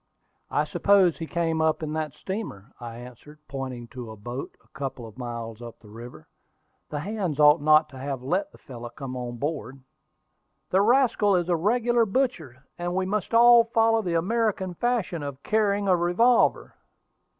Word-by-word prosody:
"I - - +1
suppose 195 -4 +3
he 165 - -5
came 165 -1 -1
up 160 0 +1
in 155 -1 -3
that 155 -1 -3
steamer," 190 - -6
I 115 -2 -8
answered, 125 +5 -12
pointing 130 -3 -6
to 120 -2 -8
a 110 - -8
boat 120 +6 -7
a - - -29
couple 135 -3 -6
of 110 - -12
miles 115 -2 -6
up 120 -1 -9
the 105 - -16
river. 115 -8 -11 0.6
"The 145 - -4
hands 185 -5 -3
ought 150 +1 +6
not 155 +1 +5
to 130 - -11
have 135 -1 -4
let 295 - -1
the - - -17
fellow 120 -3 -9
come 130 +1 -7
on 120 -1 -5
board." 135 -2 -4 0.9
"The 190 - +4
rascal 225 -3 +3
is 175 -1 0
a 175 - +3
regular 235 +6 +2
butcher, 170 - -2
and 175 +1 -3
we 190 0 0
must 210 +3 -2
all 235 0 +7
follow 225 -1 +2
the 175 -5 -2
American 195 0 -1
fashion 220 -5 -1
of 140 -1 -7
carrying 205 -2 +1
a 185 - +5
revolver." 180 +8 +2
160 Hz, 175 wpm, -25 LUFS, 130-205 Hz, 0.9 s, all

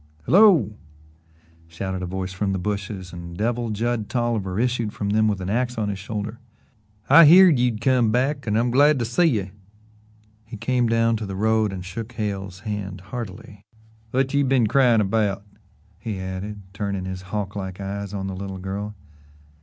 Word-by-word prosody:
"Hello!" 175 - +5 0.9
shouted 95 +3 -5
a 90 - -3
voice 95 0 -4
from 95 +1 -1
the - - -1
bushes, 100 -1 -4
and 85 0 -8
Devil 120 +2 -1
Judd 110 0 -2
Tolliver 115 -6 -1
issued 120 -3 0
from 100 -1 -3
them 110 +1 +3
with 105 -3 0
an 90 - -4
axe 125 +2 -1
on 105 -2 -1
his 100 -1 -4
shoulder. 105 +2 -5 0.7
"I 165 - +9
heerd 175 -2 +7
you'd 120 -3 0
come 125 -3 +3
back 135 +3 0
an' 105 0 +1
I'm 120 +1 +1
glad 145 +3 +5
to 120 - -1
see 120 +10 +2
ye." 105 - 0 0.9
He 110 +1 -9
came 125 +2 +1
down 115 0 +2
to 105 -2 -5
the 95 - -5
road 110 +1 +1
and 90 -2 -6
shook 110 +5 -7
Hale's 100 -4 -4
hand 105 -4 -5
heartily. 105 -2 -7 0.5
"Whut 135 +2 0
you 140 0 +3
been 130 -3 +3
cryin' 120 -1 +4
about?" 100 -1 0 0.6
he 110 -5 -5
added, 95 +2 -6
turning 100 -2 -3
his 95 0 -5
hawk 100 -1 -3
like 95 -2 -5
eyes 100 0 -5
on 100 -2 -4
the 95 - -4
little 95 0 -6
girl. 100 +3 -5
105 Hz, 175 wpm, -23 LUFS, 95-120 Hz, 0.9 s, I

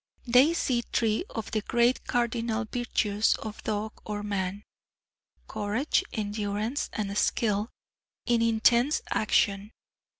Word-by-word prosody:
They 260 +7 +5
see 250 -7 +1
three 225 +5 0
of 225 - -6
the 215 - 0
great 240 +3 +1
cardinal 235 -1 0
virtues 215 -3 +1
of 215 -1 -7
dog 215 0 -3
or 210 -1 -4
man 200 -1 -3 0.8
courage, 215 +7 0
endurance, 210 +4 -2
and 200 -2 -3
skill 210 0 +1 0.6
in 240 -2 +2
intense 235 +4 +3
action. 200 -1 +1
220 Hz, 110 wpm, -28 LUFS, 205-240 Hz, 0.8 s, They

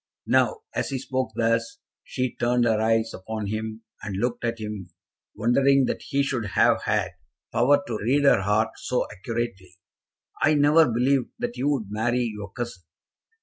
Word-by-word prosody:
Now, 460 -3 +2
as - - -2
he 135 - -2
spoke 130 -1 -2
thus, 115 +2 0 0.3
she 130 -2 -3
turned 120 0 +2
her 110 -2 +2
eyes 115 0 +1
upon 110 +2 -5
him, 110 +2 -4 0.2
and 100 -2 -5
looked 120 +3 -2
at 115 0 -1
him, 105 -4 -6 0.5
wondering 135 +4 +3
that - - -2
he 140 0 0
should 120 -5 -2
have - - +4
had - - 0 0.4
power 140 +4 +4
to 115 -2 -4
read 135 +7 +2
her 140 -8 +5
heart 105 +3 +2
so 125 - -1
accurately. 95 -4 -5 0.6
"I 155 +1 +4
never 150 +1 +5
believed 125 +3 +1
that 240 0 -3
you 140 - 0
would 115 -9 -1
marry 120 +3 0
your 100 -2 -8
cousin. 120 -6 -6
120 Hz, 165 wpm, -25 LUFS, 110-135 Hz, 0.6 s, her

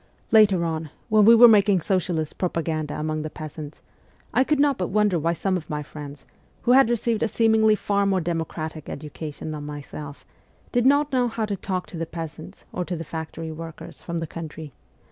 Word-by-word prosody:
Later 200 -6 +5
on, 160 -1 -3 0.2
when 215 -1 +5
we 230 +2 +9
were 240 +1 +10
making 205 -3 +5
socialist 175 -4 -1
propaganda 160 -4 -2
among 155 0 -2
the 155 - -4
peasants, 155 -1 -9 0.5
I 255 - +4
could 300 +1 +1
not 285 -4 +3
but 180 - 0
wonder 205 -3 +2
why 165 +2 +1
some 185 +2 0
of 165 - -9
my 150 -1 -3
friends, 145 -1 -10 0.4
who 245 - +3
had 260 -2 +6
received 235 -2 0
a - - +2
seemingly 220 -1 +4
far 200 -1 0
more 190 -1 +2
democratic 160 -2 -4
education 150 +1 -6
than 150 -1 -6
myself, 145 0 -8 0.5
did 245 0 +3
not 285 +1 +3
know 250 -1 +3
how 225 -1 -2
to 205 -1 -2
talk 185 -1 -3
to 175 - -9
the 165 0 -3
peasants 160 -2 -8
or 180 - -2
to 175 0 -4
the 165 - -5
factory 160 0 -6
workers 165 0 -9
from 170 -1 -4
the 165 - -2
country. 155 -3 -8
170 Hz, 195 wpm, -24 LUFS, 155-215 Hz, 0.5 s, were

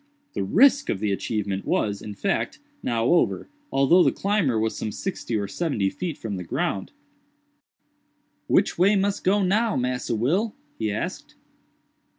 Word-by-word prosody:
The 100 - -2
risk 275 - +4
of - - +1
the 105 0 0
achievement 100 -1 -2
was, 100 -1 0
in 105 -1 -7
fact, 200 - -1 0.2
now 115 -1 0
over, 170 +7 +2 0.2
although 140 +7 +5
the - - +4
climber 195 - +1
was 110 0 -1
some 110 - -3
sixty 170 - -4
or 100 -1 -2
seventy 105 - -1
feet 170 -4 -4
from 105 -4 -4
the 90 - -5
ground. 85 - -2 1.6
"Which - - +2
way 195 +4 +5
mus 200 0 +1
go 200 +2 +2
now, 215 +4 +2
Massa 125 -2 -1
Will?" 180 - 0 0.2
he 110 -2 0
asked. 105 - -5
130 Hz, 155 wpm, -25 LUFS, -, 1.6 s, although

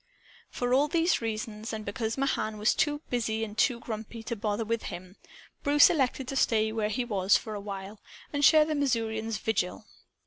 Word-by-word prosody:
For 245 0 -1
all 280 +3 +4
these 335 0 +1
reasons 220 -1 -4
and 215 -1 -5
because 225 +2 -3
Mahan 220 -6 -1
was 210 +2 +3
too 295 -1 0
busy 225 -2 -1
and 210 -1 -6
too 235 +1 +2
grumpy 225 0 -7
to 235 - -3
bother 210 0 -2
with 230 +1 -1
him 185 +2 -8 0.5
Bruce 290 0 +6
elected 265 -4 0
to 270 - -3
stay 220 -4 +2
where 220 -1 -1
he 245 +3 -1
was, 195 -4 +3
for 215 - -7
a 205 - -5
while, 200 +1 -7 0.3
and 285 0 -1
share 310 +1 +7
the 310 - -2
Missourian's 225 -6 -1
vigil. 210 -1 -2
225 Hz, 185 wpm, -28 LUFS, 215-260 Hz, 0.5 s, share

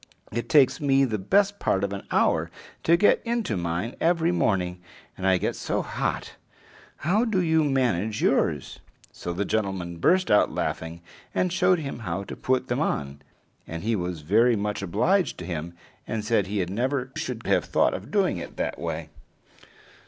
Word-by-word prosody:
It 120 +1 -3
takes 145 -3 +4
me 135 -1 +4
the 110 -4 -2
best 200 - +2
part 95 - +1
of 100 0 -1
an 100 - -4
hour - - +2 0.3
to 170 +1 +4
get 205 - +4
into 230 - -1
mine 85 +6 -2
every 170 0 +2
morning, 90 - 0 0.3
and 95 - -2
I 95 -1 +5
get - - -2
so - - -2
hot! - - -3 0.7
How 200 +8 +3
do 220 -6 +1
you 160 -3 +3
manage 115 - 0
yours?" - - +1 0.3
So 90 - -6
the 95 +4 -2
gentleman 95 -6 -2
burst 185 - +3
out 105 - +4
laughing, 80 +1 -3 0.3
and 180 -1 +1
showed 180 0 +3
him 140 -6 -5
how 105 -3 -3
to - - -7
put 130 0 0
them - - -1
on; 70 0 -2 0.5
and 80 0 -6
he 115 +1 +1
was 90 -4 -3
very 115 +10 +4
much 105 0 -2
obliged 175 - +1
to 90 - -7
him, 85 0 -5 0.3
and 110 -2 -3
said 105 -4 +2
he 100 -2 -1
never 130 +7 -2
should 120 -2 -4
have - - +2
thought - - +2
of - - -6
doing - - +1
it - - -8
that - - -2
way. - - -4
110 Hz, 175 wpm, -26 LUFS, -, 0.7 s, I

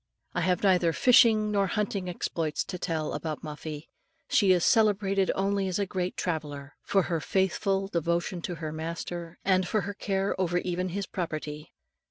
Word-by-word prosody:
I - - 0
have 180 0 +1
neither 180 -4 +4
fishing 220 -2 +5
nor 200 -1 +2
hunting 200 -2 -2
exploits 165 -3 -2
to 180 - -6
tell 160 -3 -2
of - - -1
about 155 -2 -4
Muffie. 150 0 -7 0.4
She 195 -3 +4
is 180 -2 +3
celebrated 200 -4 +3
only 195 0 0
as 185 - -1
a 200 - 0
great 185 -1 -3
traveller, 145 -4 -3
for 195 -2 +2
her 170 -2 -1
faithful 195 +3 0
devotion 170 0 -1
to 175 +1 -4
her 155 -1 -5
master, 170 +2 -5
and 185 -2 +3
for 215 +3 +1
her 200 +3 -4
care 195 -1 -1
over 175 -1 +1
even 180 +1 -1
his 195 +3 -3
property. 155 -4 -5
180 Hz, 175 wpm, -28 LUFS, 165-195 Hz, 0.4 s, fishing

